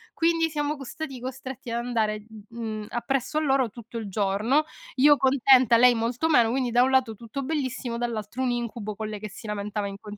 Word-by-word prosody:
Quindi 330 Hz, 0 st, +2 dB
siamo 300 Hz, 0 st, -2 dB
co 275 Hz, -, -8 dB
stati 270 Hz, 0 st, -6 dB
costretti 260 Hz, 0 st, -7 dB
ad 235 Hz, +1 st, -2 dB
andare, 215 Hz, -3 st, -1 dB, 0.2 s
mhmm, 220 Hz, -2 st, -5 dB
appresso 270 Hz, +4 st, -2 dB
a -, -, +2 dB
loro 270 Hz, -4 st, +2 dB
tutto 235 Hz, +1 st, -10 dB
il 210 Hz, -, -6 dB
giorno, 210 Hz, +9 st, +1 dB, 0.3 s
io 290 Hz, +3 st, +6 dB
contenta, 260 Hz, -2 st, +5 dB
lei 245 Hz, +1 st, +7 dB
molto 235 Hz, +6 st, 0 dB
meno, 240 Hz, -7 st, +5 dB
quindi, 255 Hz, -1 st, 0 dB
da 245 Hz, +1 st, +4 dB
un 260 Hz, -, +2 dB
lato, 260 Hz, -4 st, +2 dB
tutto 235 Hz, +6 st, -6 dB
bellissimo, 260 Hz, -5 st, -3 dB
dall'altro 235 Hz, 0 st, -3 dB
un 255 Hz, -, +1 dB
incubo, 230 Hz, -3 st, -4 dB
con 215 Hz, +1 st, -4 dB
lei 215 Hz, -1 st, -6 dB
che 215 Hz, +1 st, -6 dB
si 205 Hz, +3 st, -12 dB
lamentava 210 Hz, 0 st, -3 dB
in 195 Hz, -, -7 dB
con 210 Hz, -1 st, -9 dB
240 Hz, 205 wpm, -26 LUFS, 215-270 Hz, 0.3 s, lei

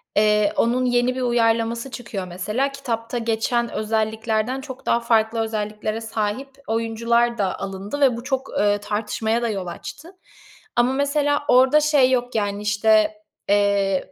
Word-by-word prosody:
Eee, 210 Hz, -1 st, +3 dB
onun 250 Hz, +2 st, +2 dB
yeni 245 Hz, +1 st, +2 dB
bir 260 Hz, -, -3 dB
uyarlaması 235 Hz, +1 st, +1 dB
çıkıyor, 220 Hz, -7 st, -6 dB
mesela. 210 Hz, +10 st, -2 dB
Kitapta 240 Hz, -3 st, -4 dB
geçen 235 Hz, +1 st, 0 dB
özelliklerden 220 Hz, +3 st, -1 dB
çok 265 Hz, -2 st, -10 dB
daha 235 Hz, -, +2 dB
farklı 225 Hz, -1 st, +1 dB
özelliklere 215 Hz, 0 st, -3 dB
sahip 220 Hz, +4 st, -3 dB, 0.2 s
oyuncular 230 Hz, +1 st, +1 dB
da 195 Hz, -3 st, -1 dB
alındı 195 Hz, +7 st, -5 dB
ve 255 Hz, -4 st, +4 dB
bu 235 Hz, -, -7 dB
çok, 265 Hz, 0 st, -2 dB
eee, 205 Hz, 0 st, +3 dB
tartışmaya 220 Hz, +2 st, -2 dB
da 235 Hz, -, 0 dB
yol 195 Hz, -4 st, -3 dB
açtı. 315 Hz, -, -8 dB, 0.6 s
Ama, 240 Hz, +2 st, +3 dB
mesela, 290 Hz, +1 st, +1 dB
orada 260 Hz, +4 st, +5 dB
şey 285 Hz, -4 st, +4 dB
yok, 245 Hz, -1 st, 0 dB
yani, 205 Hz, -1 st, -1 dB
işte, 210 Hz, 0 st, +2 dB, 0.3 s
eee, 200 Hz, -2 st, +2 dB
225 Hz, 145 wpm, -22 LUFS, 210-250 Hz, 0.6 s, orada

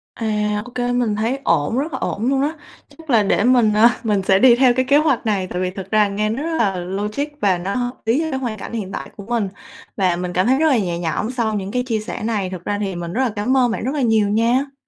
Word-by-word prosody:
À, 210 Hz, -2 st, -1 dB
ô 250 Hz, -, -11 dB
kê, 245 Hz, 0 st, -1 dB
mình 245 Hz, -4 st, 0 dB
thấy 230 Hz, +6 st, -1 dB
ổn, 145 Hz, -, +1 dB
rất 300 Hz, +4 st, -2 dB
là -, -, -3 dB
ổn 220 Hz, +4 st, -2 dB
luôn 270 Hz, 0 st, +1 dB
á! 295 Hz, +3 st, 0 dB, 0.4 s
Chắc 320 Hz, -2 st, -17 dB
là 225 Hz, -4 st, +4 dB
để 200 Hz, -, +1 dB
mình, 240 Hz, -4 st, +4 dB
à, 230 Hz, +3 st, +5 dB
mình 210 Hz, -4 st, +1 dB
sẽ 190 Hz, 0 st, +3 dB
đi 245 Hz, 0 st, +7 dB
theo 250 Hz, -1 st, +4 dB
cái 255 Hz, +1 st, 0 dB
kế 285 Hz, +2 st, +4 dB
hoạch 280 Hz, -6 st, +1 dB
này, 195 Hz, -4 st, 0 dB
tại 180 Hz, +1 st, -4 dB
vì 185 Hz, 0 st, -1 dB
thực 195 Hz, +1 st, -8 dB
ra 215 Hz, -1 st, +4 dB
nghe 210 Hz, +2 st, -1 dB
nó 255 Hz, +7 st, -3 dB
rất 325 Hz, 0 st, -2 dB
là 195 Hz, -4 st, +1 dB
logic 205 Hz, +9 st, -3 dB, 0.2 s
và 190 Hz, -3 st, +3 dB
nó 190 Hz, +3 st, -3 dB
hợp 245 Hz, -1 st, -1 dB
lý 240 Hz, +8 st, +2 dB
với 315 Hz, -5 st, -2 dB
hoàn 235 Hz, -5 st, -4 dB
cảnh -, -, -8 dB
hiện 200 Hz, -4 st, -4 dB
tại -, -, -6 dB
của 200 Hz, -, -9 dB
mình. 230 Hz, -3 st, -1 dB, 0.5 s
Và 185 Hz, -3 st, +2 dB
mình 180 Hz, 0 st, -4 dB
cảm 185 Hz, +5 st, +1 dB
thấy 260 Hz, +1 st, +4 dB
rất 320 Hz, -, +3 dB
là 265 Hz, -, +3 dB
nhẹ 175 Hz, -5 st, -2 dB
nhõm 175 Hz, +7 st, -2 dB
sau 235 Hz, -4 st, -1 dB
những 200 Hz, -1 st, -3 dB
cái 250 Hz, 0 st, 0 dB
chia 225 Hz, -4 st, -1 dB
sẻ 215 Hz, -, -6 dB
này, 210 Hz, -5 st, -1 dB
thực 180 Hz, -2 st, -8 dB
ra 205 Hz, -, -1 dB
thì 195 Hz, -3 st, -3 dB
mình 170 Hz, 0 st, -5 dB
rất 255 Hz, -, 0 dB
là 250 Hz, -, +1 dB
cám 220 Hz, +5 st, 0 dB
ơn 245 Hz, -3 st, +3 dB
bạn 230 Hz, -, -3 dB
rất 265 Hz, +4 st, -1 dB
là 285 Hz, -, -1 dB
nhiều 220 Hz, -4 st, +2 dB
nha. 245 Hz, +6 st, +1 dB
220 Hz, 285 wpm, -20 LUFS, 200-250 Hz, 0.5 s, đi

